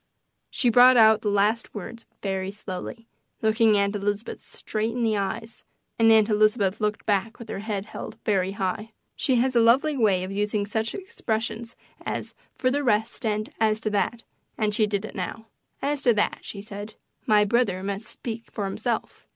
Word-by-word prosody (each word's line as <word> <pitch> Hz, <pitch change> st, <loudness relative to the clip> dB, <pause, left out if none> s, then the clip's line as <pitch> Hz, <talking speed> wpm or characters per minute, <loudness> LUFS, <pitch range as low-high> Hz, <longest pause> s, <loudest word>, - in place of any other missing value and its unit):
She 245 Hz, -3 st, +1 dB
brought 250 Hz, +2 st, +7 dB
out 220 Hz, -1 st, +6 dB
the 210 Hz, -, 0 dB
last 210 Hz, +4 st, +1 dB
words 230 Hz, +3 st, -8 dB, 0.2 s
very 190 Hz, -1 st, -2 dB
slowly, 205 Hz, +3 st, -7 dB, 0.4 s
looking 220 Hz, -1 st, +4 dB
Aunt 200 Hz, +1 st, +1 dB
Elizabeth 205 Hz, +2 st, -3 dB
straight 220 Hz, +1 st, -3 dB
in 245 Hz, 0 st, -1 dB
the 220 Hz, -2 st, +2 dB
eyes, 220 Hz, +3 st, -4 dB, 0.4 s
and 225 Hz, 0 st, +6 dB
Aunt 220 Hz, -1 st, +6 dB
Elizabeth 210 Hz, -2 st, +2 dB
looked 210 Hz, 0 st, -1 dB
back 205 Hz, +2 st, 0 dB
with 235 Hz, -, -10 dB
her -, -, -4 dB
head 205 Hz, -1 st, -4 dB, 0.4 s
very 195 Hz, -2 st, +1 dB
high. 200 Hz, +3 st, -3 dB, 0.2 s
She 260 Hz, -, +1 dB
has 250 Hz, +1 st, +2 dB
a -, -, +6 dB
lovely 260 Hz, +7 st, +4 dB
way 205 Hz, -7 st, +2 dB
of 185 Hz, -, -5 dB
using 205 Hz, +1 st, 0 dB
such 220 Hz, +2 st, -2 dB
expressions 230 Hz, -, -4 dB, 0.3 s
as -, -, -4 dB, 0.2 s
"For 255 Hz, -2 st, +1 dB
the 285 Hz, +2 st, 0 dB
rest" 220 Hz, -1 st, 0 dB
and 215 Hz, 0 st, -1 dB
"As 220 Hz, -1 st, +2 dB
to 215 Hz, -, -1 dB
that," 225 Hz, +3 st, -1 dB, 0.3 s
and 215 Hz, -1 st, 0 dB
she 215 Hz, 0 st, +2 dB
did 205 Hz, 0 st, -2 dB
it -, -, -8 dB
now. 200 Hz, +4 st, -5 dB, 0.4 s
"As 285 Hz, 0 st, 0 dB
to 240 Hz, -4 st, +4 dB
that," 205 Hz, -, +1 dB
she 200 Hz, -1 st, -7 dB
said, 210 Hz, 0 st, -8 dB, 0.3 s
"my 210 Hz, -1 st, +5 dB
brother 205 Hz, -4 st, +1 dB
must 200 Hz, +2 st, -4 dB
speak 230 Hz, 0 st, -7 dB
for 205 Hz, -, -4 dB
himself. 225 Hz, +4 st, -3 dB
215 Hz, 180 wpm, -25 LUFS, 205-230 Hz, 0.4 s, brought